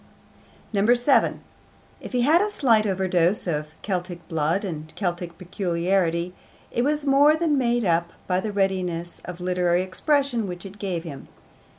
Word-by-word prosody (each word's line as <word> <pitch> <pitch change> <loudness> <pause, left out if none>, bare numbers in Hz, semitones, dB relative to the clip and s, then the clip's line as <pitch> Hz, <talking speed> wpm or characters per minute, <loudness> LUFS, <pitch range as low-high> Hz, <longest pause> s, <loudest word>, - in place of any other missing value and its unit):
7. 240 +6 +3 0.6
If - - -9
he 250 -2 +1
had 310 +8 +5
a 420 - +1
slight 230 - +3
overdose 185 -1 +1
of 150 -2 -3
Celtic 180 -3 -4
blood 165 +4 0
and 155 -4 -6
Celtic 175 -3 -3
peculiarity, 175 -1 -1 0.4
it 240 - 0
was 295 +1 0
more 285 +2 +5
than 315 -2 +1
made 240 -3 +1
up 170 -1 +2 0.2
by 180 -1 +1
the 210 +3 -3
readiness 185 -4 -1
of 180 0 -7
literary 180 0 +1
expression 240 +3 0
which 180 +1 -7
it 195 +1 -10
gave 180 -5 -3
him. 145 -6 -9
185 Hz, 150 wpm, -24 LUFS, 175-235 Hz, 0.6 s, had